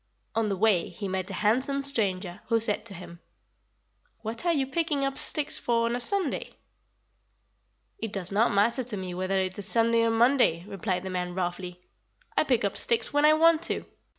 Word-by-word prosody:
On 225 -1 0
the 195 - -2
way 200 -4 +2
he 205 - -6
met 190 0 -3
a - - -6
handsome 260 +7 +1
stranger, 190 -9 -1
who 230 - +2
said 220 0 -1
to 200 - -6
him: 170 -1 -11 1.0
"'What 230 +10 -4
are - - +4
you 280 -5 +1
picking 290 0 -1
up 275 0 -2
sticks 300 -1 +1
for 230 -1 +1
on 235 +1 -1
Sunday?' 375 +4 0 1.4
"'It 225 - -4
does 190 -2 -1
not 215 +4 +2
matter 220 +6 +2
to 230 -4 -2
me 185 -1 -5
whether 185 +2 -1
it 185 +1 -3
is 200 - +2
Sunday 230 0 +3
or 230 - +2
Monday,' 225 -7 +3
replied 195 -2 -3
the 190 - -5
man 180 -1 -3
roughly. 180 0 -4 0.5
'I - - +2
pick 250 -7 +1
up 200 - -2
sticks 230 +1 +1
when 290 +1 +3
I 305 - +7
want 325 +1 +4
to.' - - -1
220 Hz, 190 wpm, -27 LUFS, 190-260 Hz, 1.4 s, I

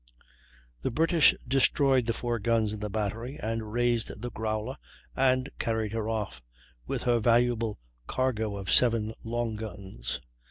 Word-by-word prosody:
The - - 0
British 165 +3 +4
destroyed 135 -1 +3
the 115 - +2
four 120 0 -2
guns 110 -1 +1
in 110 - -5
the 105 0 -3
battery, 110 +6 -3
and 110 -2 -3
raised 120 -2 0
the 120 +2 -5
Growler 110 +4 -3 0.4
and 130 0 +3
carried 110 -2 -1
her 110 -1 -2
off, 105 - -3 0.5
with - - -2
her 120 -1 +3
valuable 115 -1 +2 0.3
cargo 110 -5 -1
of 95 -1 -1
seven 115 -3 +4
long 115 -1 -2
guns. 95 - -5
115 Hz, 145 wpm, -29 LUFS, 110-120 Hz, 0.5 s, British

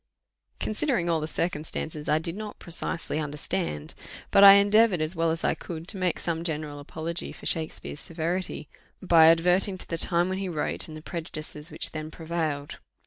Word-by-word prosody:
"Considering 215 - 0
all 165 - +2
the 155 - -3
circumstances," 155 -2 -2
I 150 - +4
did 165 +2 -3
not 210 0 -7
precisely 165 -2 -3
understand; 95 - -3 0.4
but 200 - +7
I 195 0 +12
endeavoured, 205 -1 +5
as 155 +3 -1
well 165 0 +1
as 160 +1 -2
I - - +3
could, 165 -1 -7
to 200 - -1
make 180 -3 0
some 165 -1 -2
general 150 -3 -4
apology 160 +4 -5
for - - -12
Shakspeare's 160 -2 -1
severity, 170 0 -3 0.3
by 165 -4 +6
adverting 180 +4 +4
to - - -7
the 165 - -3
time 175 +2 +2
when 190 0 -2
he 195 -1 -3
wrote, 155 -4 -2
and 155 -1 -8
the 155 - -11
prejudices 155 -2 -6
which - - 0
then 155 0 -5
prevailed. 160 -3 -3
165 Hz, 180 wpm, -27 LUFS, 155-180 Hz, 0.4 s, I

